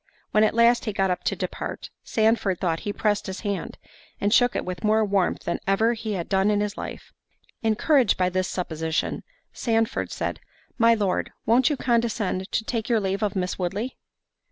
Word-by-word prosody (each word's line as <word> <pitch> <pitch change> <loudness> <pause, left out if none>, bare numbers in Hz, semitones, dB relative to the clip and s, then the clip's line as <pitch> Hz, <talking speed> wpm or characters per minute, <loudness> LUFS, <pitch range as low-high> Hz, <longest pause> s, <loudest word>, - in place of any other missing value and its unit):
When 215 - +4
at 215 - +2
last 235 +1 +4
he 215 - -2
got 195 -1 +1
up 180 - -2
to - - +1
depart, - - -5
Sandford 220 -4 +1
thought 165 -3 0
he 205 - -3
pressed 210 0 0
his 190 0 -5
hand, 205 -3 -3 0.4
and 205 +1 +1
shook 245 0 +4
it - - -1
with 180 -2 -5
more 215 0 +3
warmth 195 -3 0
than 170 - -2
ever 220 +4 +3
he 220 -2 -4
had 175 -4 -3
done 195 +1 +2
in 205 -1 +2
his 205 0 -2
life. - - -8 0.5
Encouraged 235 - +3
by 180 -1 +2
this 185 +1 -1
supposition, 160 -3 -2 0.3
Sandford 225 -2 0
said, - - -3 0.4
"My 230 0 +6
Lord, 200 -4 -1
won't 240 +5 +4
you 295 - -1
condescend 230 -6 0
to 220 - 0
take 225 -1 -2
your 230 -2 +3
leave 195 -1 -2
of 210 -2 0
Miss 185 0 -2
Woodley?" 200 +8 -2
210 Hz, 190 wpm, -25 LUFS, 190-225 Hz, 0.5 s, My